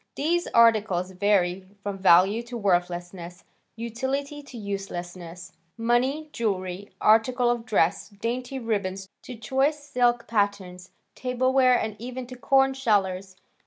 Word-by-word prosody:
These 340 +4 0
articles 215 -6 +3
vary 185 -1 +1 0.2
from 200 -1 -4
value 190 +4 +5
to 245 - -5
worthlessness, 175 -2 -2 0.3
utility 265 +6 -4
to 275 -4 -12
uselessness. 185 -3 -6 0.3
Money, 255 +7 0
jewelry, 190 -3 -3
articles 240 +3 +3
of 230 - -14
dress, 195 -2 +1
dainty 240 +5 -4
ribbons 200 -5 -3
to 250 - -9
choice 265 +7 0
silk 245 -5 0
patters, 200 -4 -2 0.2
tableware, 255 0 +2
and 220 -1 -3
even 250 +2 -6
to 255 +1 -10
"corn 270 +1 +3
shellers." 195 -7 0
220 Hz, 120 wpm, -25 LUFS, 190-250 Hz, 0.3 s, value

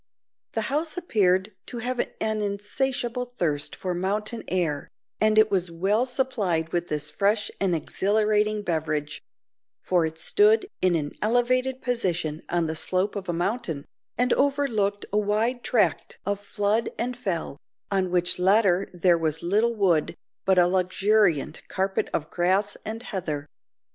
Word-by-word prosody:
The - - 0
house 310 +3 -1
appeared 200 - +1
to 245 - -6
have 245 +1 -2
an 220 -2 -1
insatiable 240 +5 -1
thirst 165 -12 -2
for 185 -1 -3
mountain 210 +5 -2
air, 165 -6 -1 0.3
and 215 0 +3
it 215 0 +5
was 185 -3 +1
well 195 +9 +1
supplied 210 -11 -1
with 175 0 0
this 150 -1 -2
fresh 210 +1 +1
and 190 -3 +1
exhilarating 210 +5 +1
beverage; 155 -4 -2 0.6
for 175 -3 +2
it 160 0 -8
stood 415 - +3
in 185 -2 +3
an 145 -3 -1
elevated 255 +3 +1
position 175 - -1
on 170 -1 +1
the 160 0 -2
slope 185 +5 0
of 195 -3 -5
a - - +3
mountain, 175 - -2 0.3
and 250 0 +3
overlooked 250 -8 +1
a 210 - +4
wide 220 +4 0
tract 195 -11 +1
of 200 0 -1
flood 205 +2 0
and 245 +2 -1
fell, 175 - -3 0.3
on 190 -2 +1
which 175 0 +1
latter 195 0 +3
there 175 -1 +3
was 160 -1 -1
little 215 +7 +2
wood, 180 -7 +2 0.3
but 190 -1 +4
a 175 - +7
luxuriant 185 -2 +2
carpet 190 0 -1
of 155 0 -3
grass 190 +4 +1
and 225 +2 -5
heather. 155 -10 -4
200 Hz, 150 wpm, -25 LUFS, 175-225 Hz, 0.6 s, a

